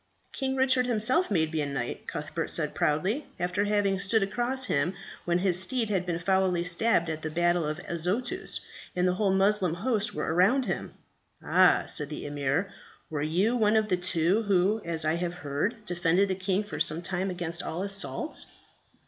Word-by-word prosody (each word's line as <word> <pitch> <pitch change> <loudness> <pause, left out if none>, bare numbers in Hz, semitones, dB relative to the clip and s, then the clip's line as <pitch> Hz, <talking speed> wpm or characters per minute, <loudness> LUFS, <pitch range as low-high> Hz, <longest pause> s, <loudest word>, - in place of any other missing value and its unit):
"King 265 -1 -2
Richard 260 -1 +3
himself 250 - +1
made 160 -5 +1
me 155 - 0
a 145 - -1
knight," 135 -4 -4
Cuthbert - - -4
said - - -2
proudly, 195 - 0
"after 180 +3 0
having 205 -2 +1
stood 200 +2 +2
across 245 +6 -1
him 165 -2 0 0.3
when 175 0 +2
his 180 -1 +2
steed 230 +1 0
had 185 -3 0
been 170 -2 -1
foully 185 -1 +1
stabbed 180 0 +2
at 160 -1 -4
the 155 - -3
battle 175 +1 +1
of 155 0 -3
Azotus, 205 - -2 0.3
and 180 0 +2
the 180 - +2
whole 195 +1 +1
Moslem 190 -3 +2
host 215 +2 -1
were 150 +1 -1
around 215 +10 +3
him." - - -4 0.5
"Ah!" - - +5
said 150 -2 +2
the 150 - -6
emir, 145 +7 -1 0.4
"were 150 -2 -2
you 180 +10 +1
one 215 -2 +3
of 215 -1 +2
the 180 - +3
two 180 +3 +1
who, 200 +1 +2
as 165 -2 0
I 155 - +2
have 175 0 -3
heard, 180 - -3
defended 175 +1 +2
the - - +1
king 190 +2 -1
for 205 - -7
some 160 +3 +2
time 190 +1 -2
against 170 -2 -3
all 175 +4 -4
assaults? 200 +10 -2
185 Hz, 185 wpm, -28 LUFS, 170-210 Hz, 0.5 s, Ah